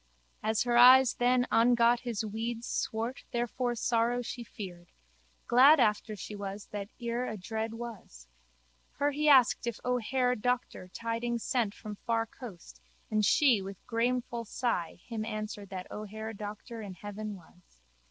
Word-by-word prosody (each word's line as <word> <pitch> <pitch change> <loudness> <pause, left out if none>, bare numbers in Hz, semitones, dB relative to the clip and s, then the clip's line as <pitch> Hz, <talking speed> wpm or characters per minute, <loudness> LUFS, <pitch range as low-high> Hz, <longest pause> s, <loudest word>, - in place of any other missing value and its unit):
As 220 0 +1
her 240 -1 +2
eyes 255 +1 +8
then 245 0 +2
ongot 235 +1 +4
his 235 -4 -3
weeds 225 +2 -4
swart 230 +4 -3
therefor 240 +1 -1
sorrow 235 +1 +1
she 240 +1 -6
feared. 180 -6 -9 0.6
Glad 275 +6 +7
after 215 -1 +1
she 210 +1 -7
was 200 0 -6
that 205 -1 -5
ere 240 +1 -2
adread 220 +2 -4
was. 215 - -9 0.7
Her 285 +1 +1
he 300 +1 +1
asked 255 -3 +5
if 235 - -3
O'Hare 250 +1 +1
Doctor 245 -4 -2
tidings 230 +3 -3
sent 230 -5 0
from 210 -1 -8
far 230 +1 0
coast 180 - -12 0.3
and 215 0 +2
she 240 0 +4
with 195 0 -7
grameful 240 0 -1
sigh 225 -7 -2
him 225 -2 -4
answered 215 -2 -5
that 185 -1 -7
O'Hare 220 +1 -6
Doctor 215 +2 -7
in 195 -3 -7
heaven 205 +2 -6
was. 175 - -20
230 Hz, 145 wpm, -30 LUFS, 210-245 Hz, 0.7 s, eyes